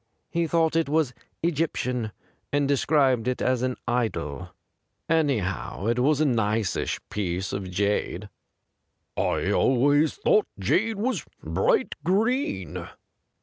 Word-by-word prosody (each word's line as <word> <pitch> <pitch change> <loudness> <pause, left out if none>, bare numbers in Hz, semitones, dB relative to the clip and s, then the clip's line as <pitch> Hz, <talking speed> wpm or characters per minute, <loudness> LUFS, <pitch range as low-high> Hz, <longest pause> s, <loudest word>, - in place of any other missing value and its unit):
He 170 0 0
thought 165 0 +2
it 165 -3 +2
was 150 -4 +1 0.3
Egyptian, 125 -8 -1 0.4
and 145 0 +2
described 135 -4 +2
it 125 - 0
as 130 -2 +1
an 130 0 -1
idol. 110 - -2 0.6
Anyhow, 120 - 0
it 115 +2 +1
was 145 +3 +3
a 155 - +3
niceish 110 - 0
piece 95 -2 -2
of 95 -2 -4
jade.' 100 +1 -1 0.5
' - - -51
I - - 0
always 145 +4 +3
thought 210 - +3
jade 220 - +1
was 245 +6 -1 0.2
bright 460 - +1
green.' 225 - 0
130 Hz, 120 wpm, -26 LUFS, 110-160 Hz, 0.6 s, was